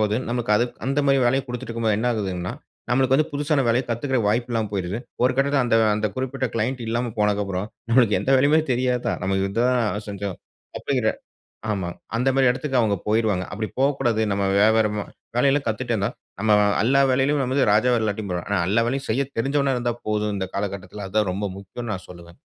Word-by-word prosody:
போது 105 Hz, 0 st, +1 dB
நமக்கு 120 Hz, -3 st, -2 dB
அது 120 Hz, -, +3 dB, 0.2 s
அந்தமாரி 140 Hz, 0 st, +2 dB
வேலைய 135 Hz, +2 st, +2 dB
குடுத்துட்டு 120 Hz, -1 st, -6 dB
இருக்கும்போது 115 Hz, -2 st, 0 dB
என்ன 120 Hz, -, -1 dB
ஆகுதுன்னா, 95 Hz, -5 st, -3 dB, 0.4 s
நம்மளுக்கு 130 Hz, +1 st, +3 dB
வந்து 155 Hz, +2 st, +1 dB
புதுசான 145 Hz, 0 st, +1 dB
வேலய 120 Hz, +3 st, +3 dB
கத்துக்கிற 130 Hz, +3 st, 0 dB
வாய்ப்பு 120 Hz, +3 st, 0 dB
இல்லாம 110 Hz, -2 st, 0 dB
போயிருது. 95 Hz, +2 st, -2 dB, 0.2 s
ஒரு 125 Hz, -, +4 dB
கட்டத்தில 140 Hz, 0 st, +2 dB
அந்த 115 Hz, -, +3 dB, 0.2 s
அந்த 110 Hz, 0 st, 0 dB
குறிப்பிட்ட 130 Hz, 0 st, -2 dB
கிளைண்ட் 120 Hz, +3 st, -1 dB
இல்லாம 120 Hz, 0 st, -1 dB
போனக்கு 105 Hz, -1 st, +2 dB
அப்புறம் 95 Hz, +1 st, -3 dB, 0.2 s
நம்மளுக்கு 115 Hz, -4 st, +4 dB
எந்த 135 Hz, -, -1 dB
வேலையுமே 145 Hz, +4 st, +4 dB
தெரியாதா? 125 Hz, 0 st, 0 dB
நமக்கு 95 Hz, +1 st, 0 dB
இது 100 Hz, -, -8 dB
தான் 120 Hz, -4 st, +1 dB
செஞ்சோம். 100 Hz, -2 st, -4 dB, 0.4 s
அப்பிடிங்கிற 125 Hz, -6 st, 0 dB, 0.6 s
ஆமா. 95 Hz, -3 st, -2 dB, 0.3 s
அந்தமாரி 135 Hz, +2 st, +2 dB
இடத்துக்கு 130 Hz, +1 st, -1 dB
அவுங்க 105 Hz, -3 st, +1 dB
போயிருவாங்க. 105 Hz, -4 st, +1 dB
அப்பிடி 110 Hz, +1 st, -3 dB
போக்கூடாது. 135 Hz, -5 st, +1 dB
நம்ம 100 Hz, 0 st, 0 dB
வியாபாரமா 105 Hz, -1 st, +3 dB, 0.3 s
வேலை 135 Hz, +3 st, +4 dB
எல்லாம் 140 Hz, -2 st, 0 dB
கத்துட்டே 120 Hz, +2 st, -2 dB
இருந்தா, 100 Hz, +1 st, 0 dB, 0.3 s
நம்ம 110 Hz, 0 st, +3 dB, 0.3 s
எல்லா 135 Hz, +3 st, +4 dB
வேலையிலும் 135 Hz, +2 st, +2 dB
நம்மது 130 Hz, -2 st, +1 dB
ராஜா 120 Hz, +4 st, +3 dB
இல்லாட்டியும் 105 Hz, -2 st, -2 dB
பரவால்ல. 90 Hz, +1 st, -4 dB
ஆனா 100 Hz, -3 st, +2 dB
எல்லா 115 Hz, +2 st, +3 dB
வேலையும் 135 Hz, +2 st, -3 dB
செய்ய 135 Hz, +5 st, +1 dB
தெரிந்தவனா 135 Hz, +2 st, +1 dB
இருந்தா 120 Hz, -1 st, -1 dB
போதும், 105 Hz, -1 st, 0 dB
இந்த 95 Hz, -1 st, -3 dB
காலகட்டத்தில 100 Hz, 0 st, -4 dB
அதுதான் 105 Hz, -1 st, 0 dB
ரொம்ப 100 Hz, +3 st, -3 dB
முக்கியன்னு 110 Hz, +3 st, -6 dB
நான் 90 Hz, -1 st, -8 dB
சொல்வேன். 85 Hz, -1 st, -13 dB
115 Hz, 185 wpm, -23 LUFS, 105-130 Hz, 0.6 s, ஒரு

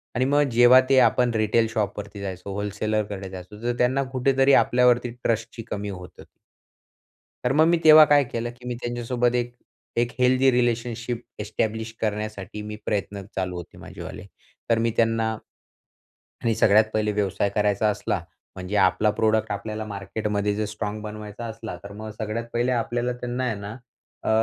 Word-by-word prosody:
आणि 125 Hz, -, +2 dB
मग 145 Hz, +2 st, +3 dB
जेव्हा 120 Hz, +2 st, +7 dB
ते 135 Hz, -, +5 dB
आपण 125 Hz, 0 st, +3 dB
रिटेल 110 Hz, +1 st, +2 dB
शॉपवरती 105 Hz, -2 st, -3 dB
जायचो, 95 Hz, 0 st, -6 dB
होल्सेलरकडे 105 Hz, -1 st, -2 dB
जायचो, 95 Hz, +2 st, -10 dB
जर 120 Hz, +1 st, -1 dB
त्यांना 130 Hz, +3 st, +2 dB
कुठेतरी 135 Hz, +1 st, +3 dB
आपल्यावरती 125 Hz, 0 st, +4 dB
ट्रस्टची 115 Hz, 0 st, -2 dB
कमी 100 Hz, 0 st, -3 dB
होतं. 90 Hz, -2 st, -9 dB, 1.2 s
तर 125 Hz, +2 st, +1 dB
मग 155 Hz, +2 st, +5 dB
मी 170 Hz, 0 st, +4 dB
तेव्हा 155 Hz, 0 st, +10 dB
काय 145 Hz, -1 st, +5 dB
केलं, 120 Hz, -1 st, -4 dB
की 125 Hz, +1 st, -13 dB
मी 125 Hz, -, -2 dB
त्यांच्यासोबत 120 Hz, 0 st, -1 dB
एक, 120 Hz, 0 st, -1 dB, 0.4 s
एक 120 Hz, +1 st, +1 dB
हेल्दी 130 Hz, +1 st, +4 dB
रिलेशनशिप 120 Hz, -1 st, -1 dB, 0.2 s
एस्टॅब्लिश 110 Hz, +1 st, -2 dB
करण्यासाठी 105 Hz, -1 st, -3 dB
मी 105 Hz, 0 st, -6 dB
प्रयत्न 100 Hz, -1 st, -2 dB
चालू 90 Hz, -1 st, -2 dB
होते 85 Hz, -, -9 dB
माझेवाले. -, -, -9 dB, 0.4 s
तर 115 Hz, -, +4 dB
मी 115 Hz, 0 st, +1 dB
त्यांना 115 Hz, -1 st, +2 dB, 1.1 s
आणि 115 Hz, -1 st, +1 dB
सगळ्यात 110 Hz, 0 st, +5 dB
पहिले 105 Hz, -1 st, +1 dB
व्यवसाय 100 Hz, -1 st, 0 dB
करायचा 105 Hz, 0 st, +2 dB
असला -, -, -2 dB, 0.4 s
म्हणजे 95 Hz, +3 st, -4 dB
आपला 105 Hz, +3 st, +3 dB
प्रॉडक्ट 110 Hz, 0 st, +2 dB
आपल्याला 110 Hz, +2 st, -4 dB
मार्केटमध्ये 105 Hz, +1 st, -2 dB
जर 105 Hz, +1 st, -1 dB
स्ट्राँग 105 Hz, 0 st, -4 dB
बनवायचा 105 Hz, +1 st, -7 dB
असला, 110 Hz, -3 st, -7 dB
तर 100 Hz, -, -8 dB
मग 110 Hz, +1 st, -7 dB
सगळ्यात 110 Hz, +2 st, -3 dB
पहिले 120 Hz, +2 st, +1 dB
आपल्याला 120 Hz, +1 st, -1 dB
त्यांना 125 Hz, +1 st, -4 dB
आहे 120 Hz, -3 st, 0 dB
ना 100 Hz, +2 st, -7 dB, 0.5 s
अ, -, -, -3 dB
110 Hz, 155 wpm, -24 LUFS, 105-120 Hz, 1.2 s, तेव्हा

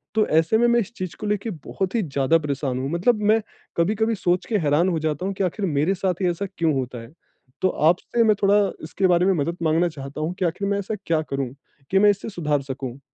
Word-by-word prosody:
तो 215 Hz, -, +3 dB
ऐसे 165 Hz, +7 st, +3 dB
में 240 Hz, +1 st, +4 dB
मैं 240 Hz, 0 st, +4 dB
इस 230 Hz, +1 st, -4 dB
चीज़ 185 Hz, -2 st, -5 dB
को 210 Hz, -, -4 dB
लेके 210 Hz, +2 st, -1 dB, 0.2 s
बहुत 190 Hz, +3 st, -3 dB
ही 225 Hz, -, +2 dB
ज़्यादा 140 Hz, +1 st, +2 dB
परेशान 140 Hz, -3 st, -2 dB
हूँ। 135 Hz, +2 st, -2 dB
मतलब 210 Hz, +6 st, +2 dB
मैं 225 Hz, -, +3 dB, 0.4 s
कभी-कभी 215 Hz, +6 st, +1 dB
सोच 180 Hz, -1 st, 0 dB
के 220 Hz, -, +1 dB
हैरान 160 Hz, +1 st, +2 dB
हो 165 Hz, -, 0 dB
जाता 155 Hz, +2 st, -2 dB
हूँ 195 Hz, -, -1 dB
कि -, -, 0 dB
आखिर 190 Hz, +2 st, -1 dB
मेरे 155 Hz, +3 st, +1 dB
साथ 185 Hz, -1 st, -2 dB
ही 180 Hz, -, +2 dB
ऐसा 175 Hz, +4 st, -2 dB
क्यों 165 Hz, -3 st, +2 dB
होता 125 Hz, -2 st, -3 dB
है? 115 Hz, -, -12 dB, 0.5 s
तो 185 Hz, -, +4 dB
आपसे 175 Hz, +10 st, +2 dB
मैं 215 Hz, -1 st, +4 dB
थोड़ा 200 Hz, +1 st, +5 dB, 0.3 s
इसके 175 Hz, +4 st, 0 dB
बारे 175 Hz, 0 st, +3 dB
में 195 Hz, -, +4 dB
मदद 170 Hz, +1 st, -1 dB
माँगना 165 Hz, +2 st, +3 dB
चाहता 140 Hz, -1 st, -7 dB
हूँ 160 Hz, +3 st, -1 dB
कि 185 Hz, -, +1 dB
आखिर 190 Hz, +4 st, -1 dB
मैं 200 Hz, 0 st, +1 dB
ऐसा 205 Hz, +2 st, -3 dB
क्या 160 Hz, -2 st, +1 dB
करूँ 135 Hz, -2 st, -1 dB, 0.4 s
कि 195 Hz, -, +4 dB
मैं 205 Hz, +1 st, +6 dB
इसे 200 Hz, +2 st, -5 dB
सुधार 150 Hz, -7 st, -1 dB
सकूँ? 135 Hz, -1 st, -6 dB
175 Hz, 240 wpm, -23 LUFS, 150-200 Hz, 0.5 s, मैं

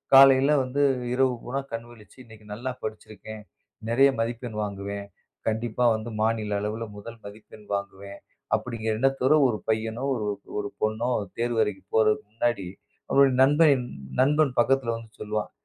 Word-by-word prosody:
காலையில 135 Hz, +1 st, +8 dB
வந்து 130 Hz, +3 st, -2 dB, 0.3 s
இரவு 130 Hz, 0 st, +3 dB
பூராம் 135 Hz, +2 st, -4 dB
கண் 115 Hz, 0 st, -4 dB
விழிச்சு, 110 Hz, -1 st, -17 dB
இன்னைக்கு 110 Hz, -2 st, -16 dB
நல்லா 125 Hz, +5 st, -4 dB
படிச்சிருக்கேன், 110 Hz, 0 st, -8 dB, 0.5 s
நிறையா 135 Hz, +4 st, +5 dB
மதிப்பெண் 115 Hz, -1 st, -4 dB
வாங்குவேன், 100 Hz, 0 st, -5 dB, 0.4 s
கண்டிப்பா 115 Hz, +2 st, -1 dB
வந்து 110 Hz, +2 st, -5 dB
மாநில 110 Hz, -1 st, 0 dB
அளவுல 110 Hz, +2 st, -3 dB
முதல் 115 Hz, +3 st, -9 dB
மதிப்பெண் 105 Hz, +1 st, -12 dB
வாங்குவேன், 100 Hz, 0 st, -7 dB, 0.4 s
அப்படிங்கற 115 Hz, -2 st, -3 dB
எண்ணத்தோட 135 Hz, +1 st, +3 dB, 0.2 s
ஒரு 110 Hz, -, -1 dB
பையனோ, 110 Hz, +2 st, -1 dB
ஒரு 110 Hz, -3 st, -3 dB, 0.3 s
ஒரு 135 Hz, -, -3 dB
பொண்ணோ, 110 Hz, +2 st, 0 dB
அந்தத் 100 Hz, -3 st, -8 dB
தேர்வு 120 Hz, -1 st, +1 dB
எழுதிப் 100 Hz, -2 st, -6 dB
போறதுக்கு 110 Hz, +4 st, +3 dB
முன்னாடி, 115 Hz, -4 st, -1 dB, 0.4 s
அவனோட 140 Hz, 0 st, +5 dB
நண்பன் 145 Hz, -2 st, +4 dB, 0.4 s
நண்பன் 150 Hz, +1 st, +3 dB
பக்கத்துல 125 Hz, -1 st, +2 dB
வந்து 115 Hz, -1 st, -12 dB
சொல்லுவான். 105 Hz, 0 st, -2 dB
115 Hz, 140 wpm, -26 LUFS, 105-130 Hz, 0.5 s, காலையில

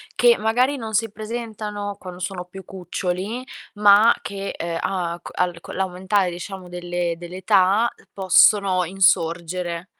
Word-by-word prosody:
che 480 Hz, -1 st, +5 dB
magari 250 Hz, +6 st, +2 dB
non 220 Hz, -2 st, -6 dB
si 225 Hz, 0 st, +1 dB
presentano 215 Hz, -2 st, -5 dB
quando 180 Hz, -1 st, -9 dB
sono 180 Hz, -1 st, -4 dB
più 190 Hz, +1 st, -11 dB
cuccioli, 190 Hz, +6 st, -4 dB, 0.3 s
ma 210 Hz, +2 st, +6 dB
che, 200 Hz, 0 st, -5 dB
ehm, 170 Hz, 0 st, -3 dB
a 175 Hz, -3 st, -2 dB
c -, -, -9 dB
al 175 Hz, -1 st, -1 dB
co' -, -, -10 dB
l'aumentare, 190 Hz, 0 st, 0 dB
diciamo, 185 Hz, +1 st, -7 dB
delle 175 Hz, -1 st, -3 dB
dell'età, 185 Hz, +5 st, +2 dB
uhm, -, -, -23 dB
possono 190 Hz, -1 st, +4 dB
insorgere. 175 Hz, -1 st, 0 dB
190 Hz, 140 wpm, -22 LUFS, 180-210 Hz, 0.3 s, ma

